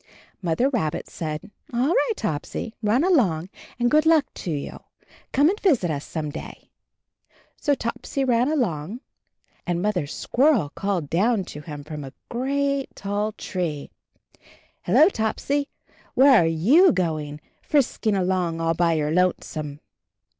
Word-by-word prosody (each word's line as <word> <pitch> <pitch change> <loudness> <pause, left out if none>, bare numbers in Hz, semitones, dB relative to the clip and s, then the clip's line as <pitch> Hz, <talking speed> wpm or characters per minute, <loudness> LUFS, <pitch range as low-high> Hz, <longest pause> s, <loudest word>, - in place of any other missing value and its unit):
Mother 180 +8 +1
Rabbit 220 - -1
said, 155 +5 -5 0.2
"All 245 +4 +1
right, 370 - +2
Topsy, 210 - -4
run 225 +6 +2
along, 195 - +2 0.3
and 240 0 +1
good 305 +1 +4
luck 320 -4 +5
to - - -6
you. 145 -3 -4 0.5
Come 285 +3 +4
and 405 +5 +1
visit 255 - +2
us 145 -1 -4
some 155 -2 -4
day." 160 - -9 0.8
So 285 - +1
Topsy 265 +3 -3
ran 245 +2 +2
along, 210 - -2 0.7
and 175 -1 0
Mother 180 -6 0
Squirrel 240 - +2
called 195 -6 -2
down 200 +5 +1
to 150 - -8
him 150 -2 -8
from 150 0 -7
a 135 - -9 0.2
great 275 +2 -1
tall 205 +2 -2
tree, 165 -9 -4 0.9
"Hello, 315 - +5
Topsy, 280 - -1 0.5
where 265 -4 +7
are - - +2
you 245 - +5
going, 155 - -2 0.2
frisk 280 -6 0
ing 210 - +3
along 180 -3 0
all 165 0 +1
by 170 0 +2
your 150 -1 0
lonesome?" 155 -4 -1
200 Hz, 140 wpm, -24 LUFS, 160-265 Hz, 0.9 s, where